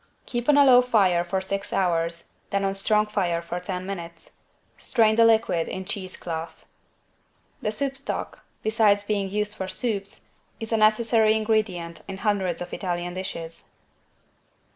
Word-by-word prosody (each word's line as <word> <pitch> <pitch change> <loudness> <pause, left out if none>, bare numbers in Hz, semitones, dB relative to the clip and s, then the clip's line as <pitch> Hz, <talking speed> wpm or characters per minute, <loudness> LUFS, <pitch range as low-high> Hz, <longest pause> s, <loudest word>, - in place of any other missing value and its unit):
Keep 240 +2 -3
on 290 - +6
a 285 - +7
low 250 -2 +8
fire 195 -8 +3
for 190 +2 -1
six 195 +1 -3
hours, 170 -2 0 0.2
then 200 0 0
on 195 - +1
a - - -4
strong 210 +2 +2
fire 185 -5 0
for 170 +1 -5
ten 180 0 -5
minutes. 170 -4 -7 0.4
Strain 220 -3 +2
the 230 - +5
liquid 220 -7 +3
in 190 0 -5
cheese 185 -2 -5
cloth. 165 -1 -6 1.0
The 210 - -1
soup 275 +5 -1
stock, 275 - -5 0.2
besides 215 -2 +3
being 205 -2 -1
used 210 +1 -2
for 190 -3 -5
soups, 200 -2 -3 0.3
is 225 0 -6
a 225 - +3
necessary 220 0 +4
ingredient 215 -6 -1
in 195 -1 -6
hundreds 190 -5 0
of 175 - -11
Italian 175 -2 -3
dishes. 170 -3 -6
200 Hz, 160 wpm, -25 LUFS, 175-220 Hz, 1.0 s, low